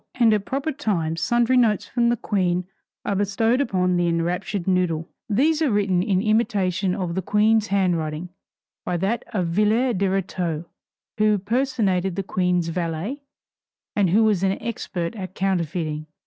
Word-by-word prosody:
And 235 -3 +4
at 205 -2 0
proper 275 +4 -2
times 165 - -2
sundry 240 +1 +2
notes 220 -5 +3
from 235 -1 +1
the 240 - +1
Queen 180 -4 0 0.4
are - - 0
bestowed 225 +6 +1
upon 180 -7 +1
the 175 0 +1
enraptured 175 +3 -1
noodle. 180 -3 +1 0.2
These 300 +9 +2
are 310 - +3
written 200 -4 +2
in 190 0 +1
imitation 200 -5 +1
of 180 -3 -3
the 190 - -1
Queen's 215 +3 +2
handwriting, 175 -4 0 0.5
by 175 - -1
that 195 +7 -1
Villette 210 +4 +1
de 200 - +2
Rétaux 180 -4 -2 0.5
who 215 -1 +4
personated 205 -5 0
the 195 - -2
Queen's 180 -2 0
valet, 170 - -3 0.7
and 200 -3 +3
who 210 +6 +4
was 210 -5 +2
an 195 0 +2
expert 180 -5 -4
at 185 -3 -7
counterfeiting. 165 -5 -1
195 Hz, 150 wpm, -23 LUFS, 175-220 Hz, 0.7 s, And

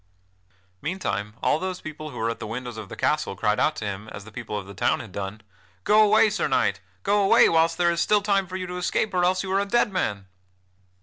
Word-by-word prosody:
Meantime 115 - -3
all - - +2
those 185 0 -4
people 155 0 -7
who - - -10
were 115 +1 0
at - - -7
the 110 - -5
windows 120 +1 -5
of 110 -3 -8
the - - -7
castle 150 -9 0
cried 105 +1 0
out 155 - +2
to 110 - -5
him, 100 +2 -5
as 100 - -9
the 110 - -12
people 110 -2 -5
of 100 - -5
the 100 - -10
town - - +1
had - - -9
done: 100 +2 -5 0.4
"Go 215 - +5
away, 215 0 +5
Sir 215 - 0
Knight! - - +1 0.2
Go 205 +1 +2
away 195 - +6
whilst 165 0 +2
there 175 -1 +3
is 170 - 0
still 210 -1 +3
time 200 -2 +1
for 185 0 -5
you 185 - -4
to 180 0 -6
escape, 195 +3 -1
or 180 -1 +2
else 185 +1 +2
you 190 - -4
are 195 - +3
a 200 - 0
dead 235 -1 +2
man!" 105 - -2
160 Hz, 250 wpm, -25 LUFS, -, 0.4 s, away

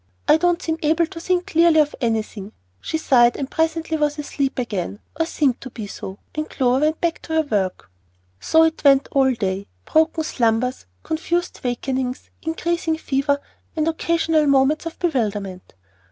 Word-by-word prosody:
I - - +6
don't 350 +1 +2
seem 320 0 -2
able 320 +2 +2
to 335 0 -9
think 360 +1 0
clearly 330 -1 +4
of 295 -1 +2
anything." 220 -3 -2 0.3
She 320 - -2
sighed, 240 -6 +4
and 275 -1 -4
presently 320 0 0
was 295 -1 0
asleep 285 -2 -2
again, 205 -6 -3 0.2
or 325 - +1
seemed 275 -7 0
to 260 - -7
be 225 -3 -7
so, 195 -1 -8 0.2
and 305 0 -3
Clover 260 +2 +2
went 310 +1 0
back 340 -1 -1
to 320 - -6
her 320 0 +3
work. 190 - -2 0.5
So 320 - +4
it 320 0 0
went 275 -1 +5
all 270 -1 +3
day, 195 -2 -2 0.2
broken 320 0 +2
slumbers, 240 - 0 0.2
confused 340 +2 -2
wakings, 255 +1 -3
increasing 325 0 -1
fever, 285 -1 0 0.4
and 310 0 0
occasional 325 -1 +1
moments 280 +4 +3
of 330 - -7
bewilderment. 205 - -2
295 Hz, 165 wpm, -21 LUFS, 245-320 Hz, 0.5 s, I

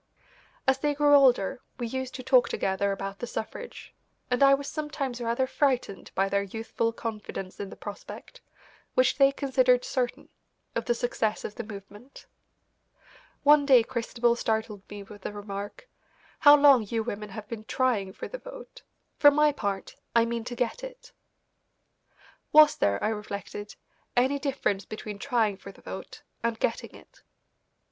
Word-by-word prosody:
As 265 0 +3
they 295 +1 0
grew 290 0 +4
older 260 -4 +4 0.2
we 240 - -3
used 260 +2 -4
to 255 - -6
talk 255 -1 +4
together 195 +1 0
about 195 0 -5
the 240 - -4
suffrage, 475 - -7 0.4
and 250 - +1
I 275 0 +7
was 280 0 -6
sometimes 285 -5 -4
rather 235 +2 0
frightened 260 -7 -1
by 195 +1 +2
their 200 0 +1
youthful 225 +3 -2
confidence 215 -4 -6
in 200 - -5
the - - -10
prospect, 205 -1 -9 0.5
which 255 +2 +3
they 275 0 +6
considered 255 -3 +2
certain, 250 -2 -2 0.4
of - - -2
the 240 - +1
success 230 -3 -1
of 210 - -5
the 235 - -6
movement. 205 +4 -11 1.2
One 295 0 +6
day 260 -4 +6
Christabel 235 0 0
startled 220 -3 -2
me 205 -1 -8
with 205 0 -13
the 205 - -5
remark: 205 - -7 0.5
"How 290 -1 +9
long 280 -4 +7
you 225 +2 -2
women 210 -2 -5
have 210 +1 -8
been 220 -1 -7
trying 220 -6 0
for - - -7
the - - -7
vote. - - -11 0.4
For 290 - +8
my 300 +1 +4
part, 200 -8 -4 0.2
I 230 0 +5
mean 235 0 -3
to 245 0 -5
get 240 - -2
it." - - -10 1.4
Was 305 0 +8
there, 100 0 +1
I - - +2
reflected, 205 -1 -6 0.4
any 265 +3 +3
difference 265 -8 -1
between 210 -1 -7
trying 225 -6 +1
for 200 - -10
the - - -19
vote - - -8 0.2
and 230 -1 -1
getting - - -2
it? - - -18
235 Hz, 160 wpm, -27 LUFS, 205-275 Hz, 1.4 s, How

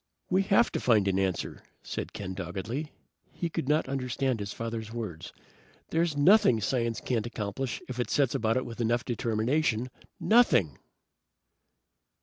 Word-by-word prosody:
"We 190 +1 +4
have 200 +4 +3
to - - -1
find 110 -5 +3
an 95 0 +2
answer," 95 -2 -2 0.2
said - - -5
Ken 95 -2 -5
doggedly. 100 - -4 0.4
He 170 -2 -3
could 135 - -3
not 155 +1 +2
understand 130 -2 -1
his 100 0 -4
father's 115 -1 -5
words. 110 -9 -6 0.6
"There's 165 -2 +1
nothing 145 - +6
science 115 +1 0
can't 120 -3 -1
accomplish 120 +2 -4
if 125 -1 -6
it 125 - -1
sets 140 -5 +2
about 110 +2 +1
it 130 - -1
with 120 0 -6
enough 120 +1 +1
determination. 120 +2 0 0.3
Nothing!" 210 - +4
120 Hz, 145 wpm, -29 LUFS, 110-140 Hz, 0.6 s, nothing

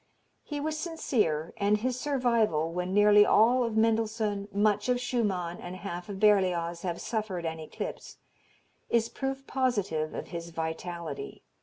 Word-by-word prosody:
He 295 -1 -5
was 310 +1 -2
sincere, 215 - -1
and 205 +1 +3
his 250 +3 -2
survival, 235 - +1
when 180 +1 -2
nearly 205 +1 +7
all 245 +5 +4
of 230 -2 -2
Mendelssohn, 220 -2 +1
much 210 +2 +1
of 250 0 +2
Schumann 195 -9 -1
and 175 +1 -7
half 180 -1 -6
of 195 -1 -5
Berlioz 180 -5 +3
have 175 -2 -3
suffered 210 -6 -3
an 160 0 -3
eclipse, 155 - -7 0.7
is 230 -1 +2
proof 270 0 -4
positive 205 - -1
of - - -6
his 170 -1 -6
vitality. 170 - -5
205 Hz, 145 wpm, -29 LUFS, 175-240 Hz, 0.7 s, nearly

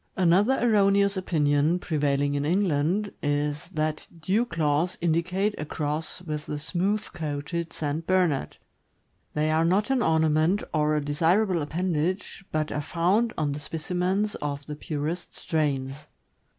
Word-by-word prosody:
Another 190 +8 +4
erroneous 200 -3 +3
opinion, 155 -3 +2
prevailing 145 -4 0
in 145 0 0
England, 180 +3 +1
is 145 +2 -1
that 155 -3 -2
dew 195 +9 +1
claws 160 -3 0
indicate 180 +5 +1
a 155 - -3
cross 155 +4 -3
with 150 -3 -5
the 150 - -3
smooth 190 +7 0
coated 160 +1 -3
St. 155 +2 -3
Bernard. 180 - +1 0.8
They 155 +1 +1
are 160 +1 +3
not 195 +8 +2
an 265 -2 +2
ornament 160 +2 +2
or 150 -1 +2
a 150 -1 -1
desirable 170 +5 +2
appendage, 175 +5 -2
but 155 -1 -1
are 150 - -1
found 180 +9 +1
on 150 -2 0
specimens 180 +7 -1
of 145 -1 -4
the 150 - -6
purest 155 +3 -4
strains. 145 -3 -2
160 Hz, 135 wpm, -26 LUFS, 150-185 Hz, 0.8 s, Another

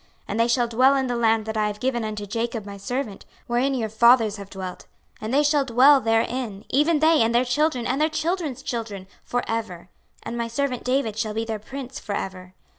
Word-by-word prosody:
26:037:025 - - -34 0.2
And 210 - -2
they 230 - +4
shall 240 0 +2
dwell 255 +4 +4
in 265 -1 +1
the 245 -1 -2
land 225 -2 +2
that 220 0 -4
I 215 -1 +2
have 210 0 -5
given 245 -2 -1
unto 210 -1 -4
Jacob 225 +1 -3
my 200 -1 -8
servant, 215 0 -4 0.2
wherein 250 +3 +1
your 230 -4 -1
fathers 220 -1 +4
have 200 -1 -9
dwelt; 185 -2 -7 0.3
and 215 +1 -4
they 285 +3 +3
shall 295 -1 +3
dwell 265 +3 +5
therein, 225 -2 -1
even 300 +4 +3
they, 315 0 +5
and 230 +1 +2
their 245 +2 +4
children, 255 -1 0
and 265 +4 0
their 310 - +3
children's 310 -3 -2
children 220 -5 -4 0.2
for 245 0 -2
ever: 210 -6 -4 0.3
and 235 - -5
my 235 -1 -2
servant 250 +1 -2
David 250 -4 0
shall 215 -1 -2
be 225 +1 -1
their 220 -1 -4
prince 260 +4 -7
for 205 - -4
ever. 185 -1 -6
235 Hz, 220 wpm, -24 LUFS, 215-265 Hz, 0.3 s, dwell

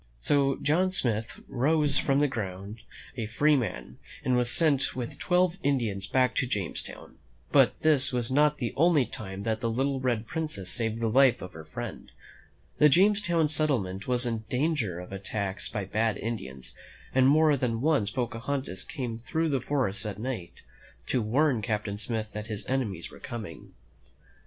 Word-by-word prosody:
So 140 - +2
John 180 +6 +2
Smith 115 - -1
rose 145 +2 +2
from 140 0 +2
the 145 - +4
ground 100 -3 -5 0.4
a 115 -4 -3
free 145 +7 +3
man, 125 -5 -3 0.3
and 125 - +2
was 125 -1 +2
sent 140 -3 +2
with 125 -2 -5
twelve 180 0 +2
Indians 115 -9 0
back 130 -1 +2
to 130 - +1
Jamestown. 100 -8 -4 0.3
But - - +4
this 150 -4 +3
was 125 -1 -1
not 150 +2 +3
the 120 -5 -3
only 160 -3 +4
time 95 -3 -6
that 110 0 -1
the 115 - 0
little 135 +4 0
Red 120 -4 0
Princess 115 - -3
saved 115 +2 -1
the 115 - +1
life 130 +2 +5
of 90 0 -8
her 80 - -9
friend. 80 - -7 0.7
The 150 - +7
Jamestown 175 -1 +3
settlement 125 -12 0
was 125 -1 +2
in 115 -2 -2
dan 150 +6 +1
ger 100 - -2
of 90 - -9
attacks 100 0 -3
by 105 -4 -3
bad 110 +3 0
Indians, 95 - -6 0.4
and 130 0 +5
more 155 +1 +5
than 125 -4 -1
once 140 -7 +2
Pocahontas 120 -3 -3
came 125 -7 -5
through 160 +7 -1
the 135 -3 +1
great - - -14
forest 110 -9 0
at 100 -2 -5
night 115 -6 -6 0.4
to 125 - 0
warn 125 +3 +2
Captain 105 -2 -2
Smith 110 0 -2
that 105 0 -5
his 110 -3 -5
enemies 110 -11 -2
were - - -13
coming. 105 -10 -8
120 Hz, 170 wpm, -28 LUFS, 105-145 Hz, 0.7 s, The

